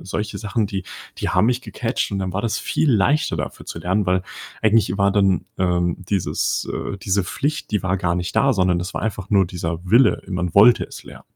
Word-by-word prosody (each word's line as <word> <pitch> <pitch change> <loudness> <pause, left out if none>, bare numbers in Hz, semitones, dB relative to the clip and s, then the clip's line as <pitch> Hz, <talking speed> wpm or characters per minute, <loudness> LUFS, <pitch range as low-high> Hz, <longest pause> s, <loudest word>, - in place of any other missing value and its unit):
solche 105 +3 -4
Sachen, 105 0 -1
die 95 -1 -4 0.3
die - - -2
haben 90 +5 +3
mich 125 0 0
gecatcht. 115 -3 -3
Und 100 - -1
dann 95 -2 -3
war 100 - -1
das 115 - -1
viel 155 - 0
leichter, 120 - +2
dafür 70 - -5
zu - - -7
lernen, 95 +3 0
weil 90 0 +1 0.4
eigentlich 110 -3 +3
war 100 0 +3
dann, 95 -2 +3 0.2
ähm, 90 -2 +1
dieses 100 -3 -1
äh, 100 - -4
diese 100 +1 0
Pflicht, 145 +11 -3
die 105 - 0
war 95 0 +1
gar 90 -2 0
nicht 90 -1 -3
da, 140 -1 +3
sondern 90 -4 +2
das 90 +4 -5
war - - -3
einfach 100 -3 -4
nur 100 -3 +4
dieser 85 -2 -4
Wille. 120 +5 +5
Äh, - - -12
man 90 -2 -2
wollte 110 +4 +7
es - - -11
lernen. - - -12
100 Hz, 220 wpm, -21 LUFS, 90-110 Hz, 0.4 s, wollte